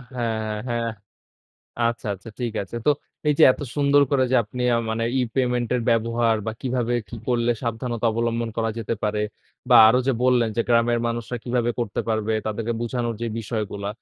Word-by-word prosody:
হ্যাঁ, 110 -3 -2
হ্যাঁ। 120 -1 -1 1.0
আচ্ছা, 115 -1 -2
আচ্ছা, 95 +4 -12
ঠিক 120 -3 -2
আছে। 100 +5 -8
তো - - +7 0.4
এই 150 - +4
যে - - +5
এত - - -10 0.2
সুন্দর 140 0 +4
করে 135 -2 +3
যে 130 - +4
আপনি 125 +4 -5
আ - - +3
মানে, 115 +1 -1
ই-পেমেন্টের 125 0 0
ব্যবহার 115 0 +2
বা 110 - -1
কীভাবে 125 -2 -1
কী - - -7
করলে 120 -1 +2
সাবধানতা 115 0 -2
অবলম্বন 115 0 -1
করা 115 0 0
যেতে 115 +1 -2
পারে? 105 0 0 0.5
বা 125 - +7
আরো 125 +3 +4
যে 135 - +3
বললেন 125 -3 +3
যে 115 - +2
গ্রামের 120 0 +3
মানুষরা 115 +1 -3
কীভাবে 120 -1 0
করতে 115 -4 -1
পারবে? 110 0 0
তাদেরকে 110 +2 -2
বুঝানোর 120 -1 -2
যে - - 0
বিষয়গুলা, 105 -2 -4
115 Hz, 175 wpm, -23 LUFS, 115-120 Hz, 1.0 s, তো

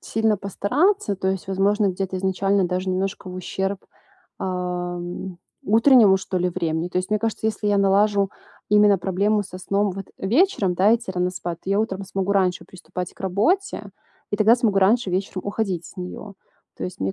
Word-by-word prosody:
сильно 220 -1 0
постараться, 205 - 0
то 190 - -1
есть 190 0 -3
возможно, 200 +2 +2
где-то 190 0 -3
изначально 195 +1 +1
даже 185 +1 -2
немножко 190 0 -3
в - - -8
ущерб, 190 +2 -3 0.6
эм, 180 0 -4 0.3
утреннему, 220 -3 +6
что 190 - -4
ли, 180 0 0
времени. 170 -1 -2
То 180 - -1
есть 185 - -3
мне 215 - +2
кажется, 225 0 -2
если 215 -1 -1
я 200 -1 +3
налажу 200 0 +3 0.4
именно 210 -2 +5
проблему 200 +4 +1
со 185 - -10
сном 200 +2 0
вот 195 0 -7
вечером, 215 - +2
да, 200 +5 +4
идти 235 -4 -4
рано 180 0 0
спать, 175 -2 -6
то 190 - -5
я 200 +2 +3
утром 195 -3 -3
смогу 195 +1 -2
раньше 185 -3 +1
приступать 180 -1 -7
к - - -26
работе- 220 - 0 0.4
и 205 - -1
тогда 220 +4 +5
смогу 215 -5 +1
раньше 200 +1 +3
вечером 185 0 -2
уходить 200 -5 -2
с - - -15
неё. 190 +2 -7 0.4
То - - -5
есть 180 - -7
мне 95 0 -1
195 Hz, 180 wpm, -23 LUFS, 185-210 Hz, 0.6 s, утреннему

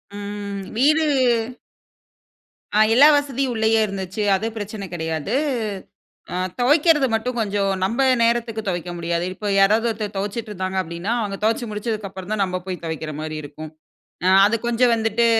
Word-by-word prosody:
ம். 205 -1 -5 0.2
வீடு. 305 +5 +4 1.7
ஆ - - +5
எல்லா 280 +5 +8
வசதியும் 275 -2 -1
உள்ளேயே 220 0 +3
இருந்துச்சு, 195 +1 -4
அது 210 +4 -2
பிரச்சனை 205 -1 -5
கிடையாது. 160 +4 -3 1.0
ஆ - - -2 0.2
துவைக்கிறது 295 +2 +4
மட்டும் 240 +2 -1
கொஞ்சம் 200 -2 0
நம்ம 235 +8 +1 0.2
நேரத்துக்கு 230 -1 0
துவைக்க 175 -1 -3
முடியாது. 170 0 -1
இப்போ 210 +2 -6
யாராவது 215 +4 +4
ஒருத்தர் 210 -2 -5
துவைச்சுட்டு 210 +3 -4
இருந்தாங்க 190 -1 -3
அப்டினா, 170 +5 -4
அவங்க 200 -2 -3
துவச்சு 225 +2 +1
முடிச்சதுக்கு 210 -1 -3
அப்புறம் 190 +2 -9
தான் 205 -2 +1
நம்ம 185 -1 -2
போய் 185 -3 -5
துவைக்கிற 160 -1 -4
மாரி 155 0 -5
இருக்கும். 150 +2 -9 0.5
அ - - +4 0.2
அது 220 +3 +2
கொஞ்சம் 240 +1 +3
வந்துட்டு 225 +1 +1
210 Hz, 150 wpm, -22 LUFS, 190-230 Hz, 1.7 s, எல்லா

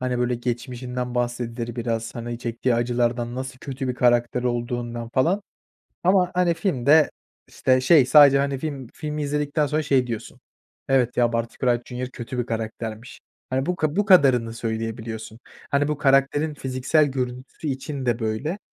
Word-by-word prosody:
hani, 125 -1 -1
böyle, 125 0 +1
geçmişinden 125 +1 -4
bahsedilir 120 -1 -3
biraz, 115 -1 -3
hani, 120 0 -5
çektiği 120 +1 -1
acılardan, 120 0 0
nasıl 130 0 -6
kötü 135 0 -5
bir 125 - -1
karakter 120 0 +2
olduğundan, 120 -1 -3
falan, 175 +10 +2 0.6
ama, 180 0 +3
hani, 180 -1 +2
filmde, 155 - +3 0.4
işte, 130 -1 +2
şey, 130 0 +5
sadece, 140 0 +7
hani, 140 -1 0
film 140 -3 -5
filmi 150 0 -4
izledikten 150 +1 0
sonra, 150 +2 0
şey, 135 -4 +2
diyorsun, 115 -3 -6 0.5
"Evet 130 -3 +2
ya, 120 -1 +3
Barty 115 0 -2
Crouch 120 -2 +2
Jr. 125 +1 -5
kötü 125 +1 -7
bir 120 - -1
karaktermiş." 115 0 -5 0.3
Hani, 130 +1 0
bu 180 - -1
bu 155 +7 +1
kadarını 130 - +5
söyleyebiliyorsun. 110 -1 -5 0.3
Hani, 140 +1 +2
bu 150 -1 -2
karakterin 140 +2 +2
fiziksel 135 +3 +1
görüntüsü 130 +2 -5
için 135 0 -4
de, 120 -1 +1
böyle, 115 - -2
125 Hz, 155 wpm, -24 LUFS, 120-140 Hz, 0.6 s, sadece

